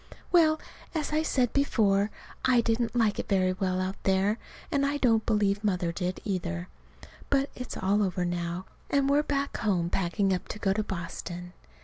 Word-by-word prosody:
Well, 315 Hz, -3 st, +5 dB, 0.4 s
as 305 Hz, -1 st, -1 dB
I 310 Hz, -, +3 dB
said 255 Hz, -6 st, +1 dB
before, 210 Hz, -7 st, +3 dB, 0.3 s
I 250 Hz, -2 st, +5 dB
didn't 230 Hz, +1 st, 0 dB
like 225 Hz, -3 st, +2 dB
it -, -, -4 dB
very 185 Hz, -2 st, +3 dB
well 185 Hz, -1 st, -1 dB
out 185 Hz, +1 st, -3 dB
there, 195 Hz, +3 st, +2 dB, 0.3 s
and 280 Hz, -3 st, +2 dB
I 285 Hz, +1 st, +1 dB
don't 225 Hz, -5 st, +2 dB
believe 205 Hz, -2 st, +2 dB
Mother 180 Hz, -4 st, +1 dB
did, 180 Hz, +1 st, -3 dB
either. 180 Hz, -3 st, -2 dB, 0.6 s
But 275 Hz, 0 st, +2 dB
it's 250 Hz, -, -6 dB
all 200 Hz, +2 st, +2 dB
over 180 Hz, -2 st, 0 dB
now, 175 Hz, +1 st, -2 dB, 0.2 s
and 280 Hz, -1 st, +2 dB
we're 285 Hz, +1 st, +4 dB
back 280 Hz, -1 st, -1 dB
home 180 Hz, -6 st, 0 dB
packing 195 Hz, +1 st, +1 dB
up 180 Hz, -, -3 dB
to -, -, -5 dB
go 195 Hz, -3 st, +1 dB
to 215 Hz, -, 0 dB
Boston. 175 Hz, -1 st, -6 dB
205 Hz, 175 wpm, -28 LUFS, 185-250 Hz, 0.6 s, Well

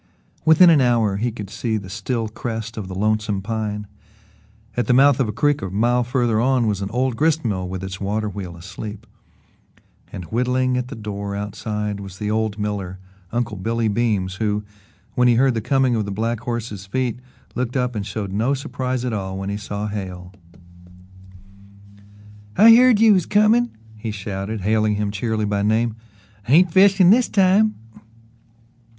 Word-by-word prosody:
Within 165 Hz, +2 st, +7 dB
an 150 Hz, -4 st, +5 dB
hour 115 Hz, -5 st, +2 dB
he 120 Hz, +3 st, -1 dB
could 105 Hz, -3 st, -8 dB
see 110 Hz, 0 st, -2 dB
the 100 Hz, -3 st, -7 dB
still 110 Hz, +4 st, -3 dB
crest 115 Hz, +1 st, -5 dB
of 105 Hz, -4 st, -6 dB
the 95 Hz, -, -7 dB
Lonesome 105 Hz, 0 st, 0 dB
Pine. 105 Hz, -1 st, -3 dB, 0.9 s
At 120 Hz, -3 st, -1 dB
the 125 Hz, -, +4 dB
mouth 140 Hz, 0 st, +5 dB
of 130 Hz, -, +2 dB
a -, -, 0 dB
creek 145 Hz, +5 st, +1 dB
a 95 Hz, -, -4 dB
mile 120 Hz, +6 st, +1 dB
farther 120 Hz, -3 st, 0 dB
on 130 Hz, -1 st, +2 dB
was 105 Hz, -2 st, -1 dB
an 100 Hz, -, -3 dB
old 125 Hz, +2 st, -1 dB
gristmill 115 Hz, -, 0 dB
with 95 Hz, 0 st, -5 dB
its 95 Hz, +1 st, -6 dB
water 105 Hz, +2 st, -1 dB
wheel 95 Hz, -4 st, -7 dB
asleep, 100 Hz, +5 st, -8 dB, 1.1 s
and 90 Hz, -, -7 dB
whittling 125 Hz, +2 st, +1 dB
at 125 Hz, 0 st, -2 dB
the -, -, -8 dB
door 100 Hz, -2 st, -5 dB
outside 105 Hz, 0 st, -4 dB
was 95 Hz, -2 st, -9 dB
the 105 Hz, +1 st, -3 dB
old 110 Hz, -1 st, -1 dB
miller, 100 Hz, -3 st, -3 dB, 0.3 s
Uncle 115 Hz, -3 st, -2 dB
Billy 115 Hz, +4 st, -1 dB
Beams, 100 Hz, -4 st, 0 dB
who, 105 Hz, -1 st, -1 dB, 0.5 s
when 125 Hz, 0 st, +3 dB
he 120 Hz, -, +4 dB
heard 130 Hz, +2 st, +3 dB
the 115 Hz, -, -2 dB
coming 130 Hz, +1 st, +2 dB
of 110 Hz, -2 st, -1 dB
the 100 Hz, -, -5 dB
black 115 Hz, +3 st, -2 dB
horse's 115 Hz, -5 st, -5 dB
feet, 125 Hz, +3 st, -2 dB, 0.3 s
looked 125 Hz, +1 st, -2 dB
up 125 Hz, -1 st, 0 dB
and 105 Hz, -3 st, -3 dB
showed 100 Hz, -1 st, -5 dB
no 115 Hz, +8 st, +1 dB
surprise 130 Hz, -1 st, -3 dB
at 125 Hz, -, -2 dB
all 95 Hz, -2 st, -4 dB
when 95 Hz, +1 st, -4 dB
he 100 Hz, -, -3 dB
saw 105 Hz, 0 st, -5 dB
Hale. 95 Hz, -3 st, -6 dB, 2.2 s
"I 225 Hz, +4 st, +9 dB
heard 250 Hz, -2 st, +5 dB
you 225 Hz, -1 st, +6 dB
was 185 Hz, -4 st, +1 dB
comin'," 220 Hz, +3 st, +3 dB, 0.3 s
he 110 Hz, +1 st, -5 dB
shouted, 100 Hz, 0 st, -5 dB
hailing 110 Hz, +1 st, +1 dB
him 105 Hz, -1 st, -1 dB
cheerily 110 Hz, +1 st, -2 dB
by 100 Hz, -1 st, -1 dB
name. 110 Hz, +2 st, +1 dB, 0.5 s
"Ain't 170 Hz, +5 st, +5 dB
fishin' 190 Hz, 0 st, +6 dB
this 245 Hz, +3 st, +4 dB
time!" 200 Hz, +2 st, +3 dB
110 Hz, 175 wpm, -21 LUFS, 100-125 Hz, 2.2 s, I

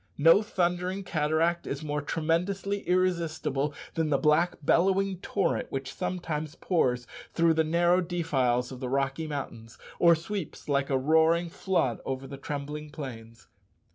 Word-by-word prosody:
No 165 Hz, +7 st, +6 dB
thundering 185 Hz, -1 st, -1 dB
cataract 165 Hz, +1 st, 0 dB
is 140 Hz, +2 st, -4 dB
more 150 Hz, -1 st, -2 dB
tremendously 180 Hz, +7 st, -1 dB
irresistible 165 Hz, -6 st, 0 dB, 0.2 s
than 160 Hz, -2 st, 0 dB
the 140 Hz, -, +3 dB
black 155 Hz, +4 st, +3 dB
bellowing 190 Hz, +4 st, +2 dB
torrent 190 Hz, -2 st, -1 dB
which 135 Hz, -1 st, -4 dB
sometimes 155 Hz, -3 st, -3 dB
pours 125 Hz, -11 st, 0 dB, 0.3 s
through 165 Hz, -1 st, +4 dB
the 160 Hz, 0 st, +2 dB
narrow 175 Hz, +3 st, +3 dB
defiles 135 Hz, -9 st, 0 dB
of 130 Hz, -, -8 dB
the 125 Hz, -1 st, -4 dB
Rocky 135 Hz, +3 st, -1 dB
Mountains, 115 Hz, -6 st, -6 dB, 0.2 s
or 170 Hz, -1 st, +6 dB
sweeps 170 Hz, +1 st, -6 dB
like 140 Hz, -1 st, +1 dB
a 135 Hz, -, +2 dB
roaring 160 Hz, +4 st, +3 dB
flood 165 Hz, -, 0 dB
over 135 Hz, 0 st, -4 dB
the 140 Hz, +1 st, -8 dB
trembling 150 Hz, +2 st, -5 dB
plains. 115 Hz, -6 st, -9 dB
160 Hz, 140 wpm, -28 LUFS, 140-175 Hz, 0.3 s, No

